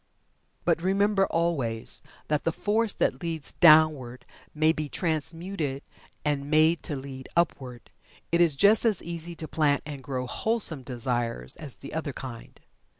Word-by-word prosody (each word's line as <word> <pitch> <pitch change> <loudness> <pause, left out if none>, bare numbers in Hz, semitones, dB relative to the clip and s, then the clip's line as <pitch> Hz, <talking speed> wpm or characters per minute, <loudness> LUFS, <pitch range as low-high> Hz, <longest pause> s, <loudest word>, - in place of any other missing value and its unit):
But - - +2
remember, 195 +2 +2
always, 140 -10 -1 0.3
that 150 -1 0
the 165 - +1
force 215 +5 0
that - - 0
leads 165 -3 -4
downward 155 -7 +5 0.3
may 155 +1 +3
be 155 -2 -4
transmuted 160 -2 -3 0.4
and 145 -1 -1
made 155 +2 +4
to 150 - -2
lead 135 -1 -8
upward. 130 -8 -1 0.4
It 170 +1 +3
is 165 -5 +4
just 205 +9 +5
as 220 -6 +2
easy 170 0 -5
to 160 -1 -7
plant 145 -1 +1
and 145 -2 -7
grow 130 -1 -4
wholesome 185 - +1
desires 120 - -3
as 145 -5 -5
the 140 - -10
other 155 -3 -3
kind. 125 -4 -9
155 Hz, 150 wpm, -27 LUFS, 135-170 Hz, 0.4 s, downward